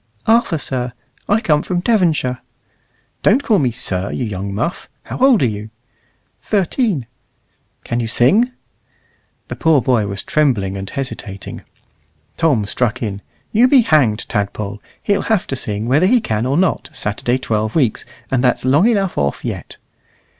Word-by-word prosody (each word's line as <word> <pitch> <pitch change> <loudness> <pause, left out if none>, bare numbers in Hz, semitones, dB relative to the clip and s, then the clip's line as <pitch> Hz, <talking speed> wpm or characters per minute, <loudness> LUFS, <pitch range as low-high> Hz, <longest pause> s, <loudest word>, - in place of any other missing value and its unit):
"Arthur, 225 -6 +3
sir. 125 -4 -3 0.4
I 210 +2 +3
come 150 -6 +2
from 175 +1 -2
Devonshire." 165 - +1 0.8
"Don't 250 +8 +3
call 215 -7 +3
me 130 -5 +2
'sir,' 100 -4 -1
you 125 - -2
young 100 -2 -4
muff. 115 - -3
How - - -7
old 255 - +5
are - - +4
you?" 105 -1 -3 0.7
"Thirteen." 200 - 0 0.8
"Can 120 - -2
you 115 - -1
sing?" 180 - +3 1.0
The - - -5
poor 160 -3 +3
boy 120 -4 +1
was 100 -1 -5
trembling 115 -11 +1
and 95 0 -5
hesitating. 110 -7 -6 0.7
Tom 145 -11 +2
struck 120 +3 -1
in 100 -2 -4 0.3
"You 235 +4 +5
be 260 -1 +6
hanged, 140 - +2
Tadpole. 100 0 -3 0.2
He'll 200 - +1
have 220 -5 +2
to 135 - -3
sing, 105 -3 -3
whether 150 +9 +4
he 245 +4 +4
can 110 - -1
or 140 +3 +1
not, 185 0 +1
Saturday 115 +4 -1
twelve 110 -4 -2
weeks, 130 -9 +1 0.3
and 130 -1 +1
that's 125 0 +1
long 145 - +4
enough 195 -5 0
off 70 -1 -1
yet." - - -5
130 Hz, 155 wpm, -18 LUFS, -, 1.0 s, be